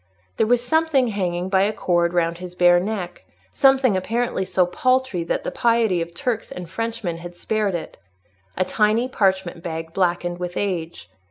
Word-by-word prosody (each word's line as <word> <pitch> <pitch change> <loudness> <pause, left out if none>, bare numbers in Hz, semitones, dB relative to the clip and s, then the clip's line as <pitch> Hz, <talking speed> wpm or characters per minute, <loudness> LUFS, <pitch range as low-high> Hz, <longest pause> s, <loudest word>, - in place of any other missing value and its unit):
There 220 - +2
was 245 +1 +2
something 310 -3 +2
hanging 180 -3 -2
by 190 0 +2
a 200 +2 +2
cord 175 -4 +1
round 170 -1 0
his 180 -1 -8
bare 175 0 +5
neck; 185 -2 -4 0.3
something 270 -5 +4
apparently 225 +2 -1
so 185 -1 +2
paltry 255 0 0
that - - -2
the - - -3
piety 230 -6 +2
of 170 +1 -6
Turks 230 +4 -2
and 180 -1 -7
Frenchmen 225 -2 -3
had 175 +1 -9
spared 210 0 -1
it—a 95 - -7
tiny 215 +5 +2
parchment 190 -7 0
bag 165 -1 -5
blackened 175 -1 0
with 180 0 -4
age. 170 - -3
185 Hz, 165 wpm, -22 LUFS, 175-225 Hz, 0.3 s, bare